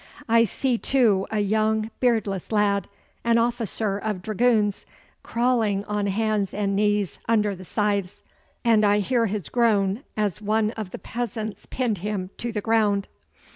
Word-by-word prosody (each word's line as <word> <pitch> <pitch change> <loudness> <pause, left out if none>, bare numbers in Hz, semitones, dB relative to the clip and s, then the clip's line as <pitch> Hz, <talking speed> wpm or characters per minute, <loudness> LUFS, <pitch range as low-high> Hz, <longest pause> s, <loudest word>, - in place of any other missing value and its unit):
I 230 0 +5
see, 240 +3 -1
too, 225 -8 +2
a 215 -1 0
young 215 +1 +1
beardless 220 -7 0
lad, 205 -2 +2 0.4
an 235 0 +3
officer 230 -3 0
of 205 -4 -3
dragoons, 215 -1 +1 0.3
crawling 230 -5 +1
on 210 -1 -1
hands 210 -1 0
and 200 -1 0
knees 205 -2 +1
under 210 -3 +2
the 185 0 -10
scythes, 200 -2 -1 0.4
and 225 -2 +4
I 205 0 +4
hear 230 +3 +1
his 205 -3 -3
groan 215 -3 +2 0.2
as 210 -2 -1
one 215 +1 +1
of 220 -4 -6
the - - -7
peasants 220 0 -5
pinned 235 -7 -1
him 195 -1 -3
to 235 - -3
the 210 -2 -3
ground. 210 -2 +1
210 Hz, 150 wpm, -24 LUFS, 200-225 Hz, 0.4 s, I